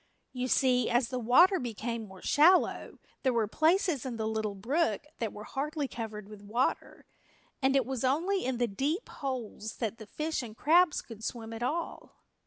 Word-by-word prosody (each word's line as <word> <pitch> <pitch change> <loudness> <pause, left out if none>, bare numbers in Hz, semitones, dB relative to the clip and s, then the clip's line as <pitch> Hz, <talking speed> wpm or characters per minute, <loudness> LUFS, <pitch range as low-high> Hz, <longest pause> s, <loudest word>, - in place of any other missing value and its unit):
You 255 0 -2
see, 255 -1 +3
as 240 0 +2
the 255 - -2
water 345 - +5
became 230 -1 -4
more 190 -1 -13
shallow 345 +5 +3 0.2
there 260 - +2
were 230 -2 +1
places 320 - +2
in 250 -3 -4
the 220 -1 -2
little 220 -2 -2
brook 240 - 0
that 225 -3 -2
were 210 - -9
hardly 290 +4 -3
covered 215 -4 -6
with 210 -1 -11
water, 225 +5 -2 0.6
and 265 0 +3
it 270 -3 +3
was 265 -1 -3
only 340 +9 +1
in 255 -1 -1
the 240 - +2
deep 280 - -2
holes 240 -5 -5
that 230 -1 -3
the 220 - -10
fish 310 +7 -2
and 225 -3 -9
crabs 340 +1 +4
could 225 -2 -11
swim 225 -1 -5
at 225 - -7
all. 320 +7 -3
250 Hz, 185 wpm, -30 LUFS, 220-290 Hz, 0.6 s, water